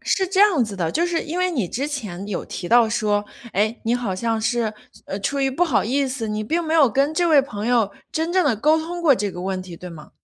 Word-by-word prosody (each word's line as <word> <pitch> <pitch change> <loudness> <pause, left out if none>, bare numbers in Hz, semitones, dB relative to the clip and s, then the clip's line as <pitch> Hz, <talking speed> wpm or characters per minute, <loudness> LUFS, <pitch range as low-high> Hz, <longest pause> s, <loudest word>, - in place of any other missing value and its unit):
是 380 - 0
这 385 +1 +1
样 370 - +5
子 210 -2 -6
的， 165 -3 -1
就 340 +2 +1
是 340 -2 -1
因 330 +4 -4
为 365 0 +1
你 240 - -1
之 275 +4 -2
前， 205 -10 -5
有 205 -4 -4
提 175 - -6
到 235 -1 +5
说， 210 -2 0 0.3
诶， 215 +4 0
你 235 +2 +1
好 235 -6 -2
像 225 +3 -1
是 225 -1 0 0.3
呃， 195 - -4
出 280 +7 -1
于 270 - +2
不 325 +7 +1
好 290 -12 +1
意 270 +4 +1
思， 255 -3 -4
你 215 0 -2
并 330 +10 -1
没 320 0 -1
有 295 -5 +6
跟 280 +6 +1
这 345 +1 +2
位 295 -3 +6
朋 215 -5 -5
友 230 -5 +2 0.2
真 325 +2 -2
正 370 -1 +3
地 245 -7 +2
沟 305 +8 +3
通 345 +2 -5
过 315 -5 +5
这 205 -3 -2
个 180 - -8
问 185 0 -3
题， 180 -2 -10
对 180 - -9
吗？ 160 -3 -12
240 Hz, 285 characters per minute, -22 LUFS, 205-315 Hz, 0.3 s, 有